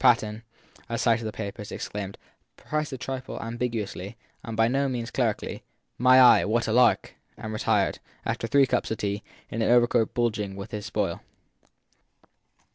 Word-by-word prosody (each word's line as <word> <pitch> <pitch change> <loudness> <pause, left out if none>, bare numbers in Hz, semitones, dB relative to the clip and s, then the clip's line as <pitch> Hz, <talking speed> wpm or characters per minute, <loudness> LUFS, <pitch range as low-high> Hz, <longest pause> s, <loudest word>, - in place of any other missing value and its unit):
Patten, 105 +1 +3 0.5
at 115 0 -2
sight 115 -1 +3
of 115 - -4
the - - -3
papers, 105 0 -6
exclaimed, 100 -1 -5 0.4
perhaps 150 -1 -3
a 130 - -4
trifle 130 +1 -5
ambiguously, 115 -3 -4 0.3
and 115 -1 -6
by 115 0 +4
no 135 +3 +1
means 120 -1 -3
clerically, 115 -5 -1 0.4
My 130 +1 +7
eye, 125 -1 +8
what 115 +3 +1
a 110 - 0
lark! 125 +1 +4 0.2
and 110 0 -6
retired, 110 - +1 0.3
after 115 - -2
three 140 +4 +5
cups - - 0
of 110 - -2
tea, 100 0 -2 0.3
in 115 - -2
an - - +2
overcoat 120 -1 +3
bulging 105 -5 0
with 100 0 -8
his 105 0 -5
spoil. - - -2
115 Hz, 165 wpm, -26 LUFS, 105-125 Hz, 0.5 s, eye